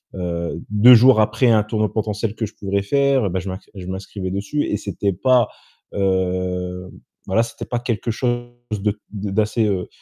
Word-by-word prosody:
heu, 85 -2 -3
2 105 +4 +7
jours 120 -1 +6
après 115 +4 +2
un 110 -2 +4
tournoi 110 0 -1
potentiel 105 0 -2
que 110 - -2
je 105 - -10
pourrais 100 0 -1
faire, 135 -1 +2
bah, 95 - -1
je 95 +1 -6
m 95 - -4 0.2
je 90 -2 -8
m'inscrivais 95 0 -5
dessus 100 +10 -2
et 105 - -1
c'était 100 0 -2
pas 125 +4 +3 0.4
heu, 90 -1 -1 0.4
voilà, 110 +4 +2
c'était 115 - -7
pas 120 - -2
quelque 120 -1 -2
chose 120 +1 -1 0.2
de 105 0 -1
d'assez, 105 +2 0
heu 95 -4 -1
105 Hz, 175 wpm, -21 LUFS, 95-115 Hz, 0.4 s, 2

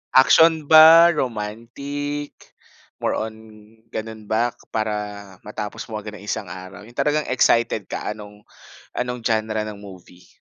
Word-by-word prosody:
Action 160 +4 +6
ba, 160 +2 +9
romantic, 140 +4 -4 0.7
more - - +1
on 110 0 -5 0.6
ganun 110 0 -6
ba 115 +2 0 0.2
para 110 -1 -1 0.5
matapos 105 0 -6
mo 110 - -3
agad 105 0 -9
nang 100 - -12
isang 105 0 -4
araw, 95 +4 -10
yung 120 - -17
talagang 150 0 0
excited 115 -4 +2
ka 105 - -4
anong 105 -1 -13 0.5
anong 125 -1 -4
genre 110 -1 0
ng 105 -1 -8
movie? 90 -3 -14
110 Hz, 135 wpm, -22 LUFS, 105-135 Hz, 0.7 s, ba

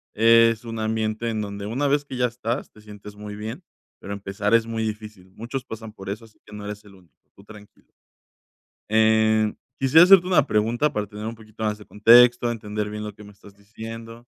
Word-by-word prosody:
Es 115 +1 +4
un 115 -1 -6
ambiente 110 +1 -2
en 110 -1 -2
donde 100 0 -6
una 135 +6 -1
vez 145 +1 +1
que 130 -3 -8
ya 125 - +2
estás, 120 +1 -4
te 105 - -18
sientes 105 -1 -12
muy 105 0 -8
bien, 110 - -7 0.4
pero 100 - -9
empezar 100 +2 -1
es 115 -1 +3
muy 115 -1 -4
difícil. 105 -3 -7
Muchos 125 +4 -5
pasan 110 -1 -9
por 95 -2 -9
eso, 110 +3 -6
así 110 - -23
que 105 - -13
no 105 -1 -8
eres 105 0 -7
el 100 -2 -17
único. 85 -8 -23 0.2
Tú 100 - -17
tranquilo. 105 -1 -17 1.0
Eh, 110 0 +3 0.2
quisiera 135 +6 +6
hacerte 190 -2 +7
una 165 -7 +3
pregunta 120 +8 +1
para 105 0 -2
tener 105 +1 -8
un 115 +1 -5
poquito 110 -1 -15
más 105 -1 -1
de 105 - -14
contexto, 120 +2 +5
entender 105 -2 -4
bien 105 0 -6
lo 105 -1 -6
que 105 - -14
me 105 - -14
estás 100 0 -18
diciendo. 115 +2 -10
110 Hz, 210 wpm, -23 LUFS, 105-115 Hz, 1.0 s, hacerte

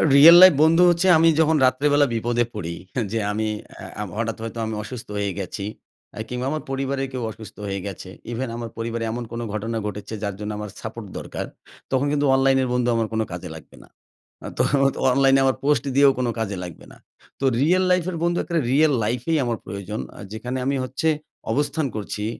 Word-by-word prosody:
Real 165 +5 +10
life 185 -3 +10
বন্ধু 165 +3 +5
হচ্ছে 175 +2 +2
আমি 165 - +5
যখন 160 0 +4
রাত্রেবেলা 145 +3 +3
বিপদে 120 +1 +1
পড়ি। 85 -5 -5 0.4
যে 115 - 0
আমি 110 +1 -1 0.5
আ - - -1
হঠাৎ 115 -1 -2
হয়তো 115 +1 -5
আমি 110 - -4
অসুস্থ 125 +2 -8
হয়ে 100 -1 -1
গেছি 100 +1 -5 0.5
আ - - -5
কিংবা 125 +1 -3
আমার 155 - -3
পরিবারে 135 0 -2
কেউ 125 -2 -4
অসুস্থ 110 -1 -12
হয়ে 100 0 -3
গেছে। 95 -1 -8 0.2
ইভেন 120 +1 -3
আমার 115 -1 -5
পরিবারে 115 0 -3
এমন 120 +1 -4
কোনো 120 0 -4
ঘটনা 115 +2 -3
ঘটেছে 105 +1 -6
যার 100 -2 -2
জন্য 105 0 -4
আমার 105 - -5
সাপোর্ট - - -7
দরকার। - - -5 0.5
তখন 135 +1 +2
কিন্তু 145 0 +1
অনলাইন 135 0 +3
এর 130 - -1
বন্ধু 125 -1 +1
আমার 115 -1 0
কোনো 110 0 +1
কাজে 90 0 -6
লাগবে 80 - -13
না। - - -19 0.7
তো - - +3 0.5
অনলাইন 135 0 +4
এ - - +3
আমার 130 - +2
পোস্ট 145 -3 +2
দিয়েও 140 0 +6
কোনো 125 -2 0
কাজে 100 -4 -2
লাগবে 85 -3 -9
না। - - -15 0.4
তো 135 - -1 0.2
রিয়াল 180 +6 +3
লাইফ 180 -1 +3
এর 170 - -4
বন্ধু 175 0 +1
এক্কারে 170 -2 -1
রিয়াল 150 0 +4
লাইফ 120 +3 -1
এই 160 - +3
আমার 115 -2 -1
প্রয়োজন। 100 +2 -5 0.2
আ - - -12
যেখানে 125 +4 -4
আমি 140 - +1
হচ্ছে 135 +6 -2 0.4
অবস্থান 145 +1 0
করছি। 105 0 -4
125 Hz, 200 wpm, -23 LUFS, 110-140 Hz, 0.7 s, রিয়াল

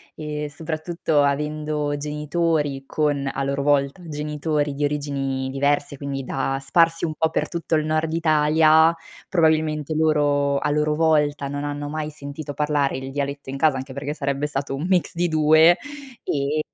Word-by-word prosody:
Ehm, 150 -1 -4
soprattutto 155 0 -1
avendo 150 +1 -1
genitori 150 -1 -1
con, 145 -2 0
a 140 - -2
loro 140 0 -1
volta, 145 +4 +1
genitori 150 -1 -2
di 145 - -2
origini 140 -2 -2
diverse, 140 +1 0
quindi 140 -1 -4
da 135 +1 -2
sparsi 165 +4 +2
un 155 -2 -1
po' 160 +1 +1
per - - 0
tutto 170 -1 -4
il 155 - +2
nord 155 +1 0
Italia, 160 0 +4 0.3
probabilmente, 155 -3 +1
loro, 145 -2 +2
a - - -1
loro 150 +1 +1
volta, 150 -2 +2
non 145 +1 -4
hanno 145 0 -4
mai 155 0 -4
sentito 145 0 -7
parlare 145 -2 0
il 135 0 -6
dialetto 140 0 -4
in 135 - -4
casa, 150 -2 +3
anche 130 +1 -6
perché 140 +2 -4
sarebbe 140 -1 -2
stato 140 -1 -3
un 145 +5 -4
mix 185 -2 +1
di 175 +1 +1
2, 155 +1 +6 0.5
ehm, 145 +2 -1
150 Hz, 160 wpm, -23 LUFS, 140-155 Hz, 0.5 s, 2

